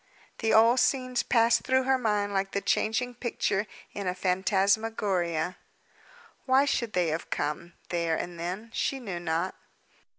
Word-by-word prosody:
The 225 - +1
old 230 +3 +6
scenes 255 -2 +1
passed 230 -1 +3
through 260 0 +2
her 265 0 +2
mind 210 -3 0
like 195 0 -1
the 200 - +1
changing 245 +5 0
picture 220 -4 -1 0.3
in 200 -2 -4
a 180 - -1
phantasmagoria. 190 -2 0 0.9
Why 265 +2 +5
should 235 -5 -1
they 175 -2 +2
have 160 +2 -3
come, 150 +4 -3 0.2
there 170 -2 0
and 175 +1 -5
then? 190 +7 -5
She 270 - -1
knew 195 -8 -5
not. 170 +2 -1
205 Hz, 145 wpm, -28 LUFS, 175-235 Hz, 0.9 s, old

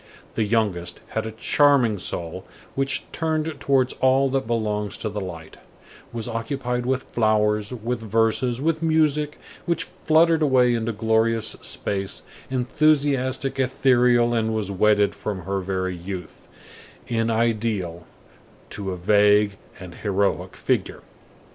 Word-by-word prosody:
The 110 - 0
youngest 100 -6 -1
had - - -2
a - - -5
charming 120 -1 +3
soul, 85 -2 -5 0.3
which 135 0 -1
turned 160 -2 -2
towards 130 -2 +2
all 135 +1 +4
that 135 -2 -1
belongs 105 -3 -1
to 110 - -3
the 105 0 -4
light, 85 -4 -8 0.5
was 115 -1 -4
occupied 125 +1 -3
with 130 0 0
flowers, 105 -1 +2
with 120 0 -3
verses, 115 +3 +1
with 160 +2 0
music, 155 -2 +1 0.3
which 170 - +1 0.2
fluttered 160 +1 +4
away 130 -4 +4
into 115 0 -1
glorious 110 0 +1
space, 100 -1 -3 0.3
enthusiastic, 135 0 +1
ethereal, 125 -2 +3
and 110 -1 0
was 105 -3 -2
wedded 105 +1 +3
from 100 -3 -5
her 95 +2 -2
very 95 -1 -2
youth, 90 0 -8 0.6
in 115 -1 0
ideal, 110 -7 -1 0.6
to 100 -1 -5
a 90 - -3
vague 105 +2 +4 0.2
and 90 -2 -9
heroic 100 0 -1
figure. - - -2
115 Hz, 130 wpm, -23 LUFS, 105-130 Hz, 0.6 s, all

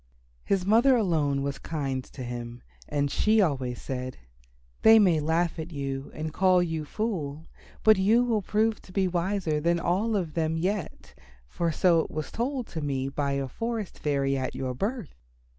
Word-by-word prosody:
His 190 -2 0
mother 235 +6 +5
alone 155 - +1
was 140 0 -3
kind 135 -5 -3
to 130 - -9
him 120 0 -6 0.3
and 145 -1 0
she 220 +1 +3
always 135 - 0
said, 130 -1 -5 0.6
"They 220 0 +8
may 180 -7 +4
laugh 160 +2 0
at 160 +2 -5
you 135 -2 -4
and 155 0 -4
call 185 -1 +4
you 160 -3 -3
fool, 160 -7 -3 0.4
but 215 -1 +6
you 215 +6 +4
will 230 -4 +1
prove 215 +3 0
to - - -16
be 190 0 +1
wiser 175 -3 0
than 170 +2 +1
all 195 +7 0
of 175 -6 -2
them 160 -1 0
yet, 185 +1 -3 0.3
for 170 - -1
so 170 +1 +3
it - - -1
was 155 -1 -5
told 250 -3 -3
me 135 -2 -2
by 140 0 -1
a 140 -1 -1
forest 225 - -4
fairy 140 -2 0
at 130 -1 -3
your 130 -1 -3
birth." 205 - -3
165 Hz, 175 wpm, -27 LUFS, 140-200 Hz, 0.6 s, They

